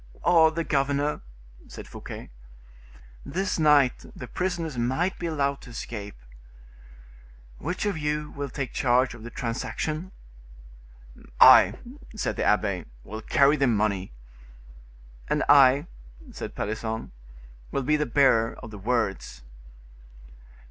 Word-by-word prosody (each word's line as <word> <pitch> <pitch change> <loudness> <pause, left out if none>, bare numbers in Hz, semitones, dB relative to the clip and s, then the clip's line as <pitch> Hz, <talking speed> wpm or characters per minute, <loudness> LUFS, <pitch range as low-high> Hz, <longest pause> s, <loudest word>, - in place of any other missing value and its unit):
"Or 165 -2 +5
the 165 +1 -3
governor," 145 0 0 0.5
said - - -10
Fouquet. - - -9 0.9
"This 185 - -2
night 145 -5 +4
the 125 - -7
prisoners 170 -2 -3
might 130 +10 -1
be 170 - -3
allowed 140 -3 -1
to - - -12
escape." 105 -3 -7 1.4
"Which 180 +6 -3
of 200 -6 -1
you 150 0 -2
will 140 0 -5
take 135 -1 -5
charge 125 0 +2
of 120 - -12
the 115 - -8
transaction?" 155 +9 -4 1.3
"I," - - +8 0.4
said 215 - -2
the - - -2
abbe, 100 -3 +1 0.2
"will 110 +2 -7
carry 140 +6 +3
the 135 -2 +2
money." 105 -4 0 1.2
"And - - 0
I," 140 0 +6 0.5
said - - -7
Pelisson, 110 +1 -4 0.6
"will 140 - -2
be 150 +4 +2
the 150 -1 -1
bearer 115 -3 +3
of 115 - -11
the 105 - -9
words." 110 - -2
140 Hz, 120 wpm, -26 LUFS, 115-150 Hz, 1.4 s, I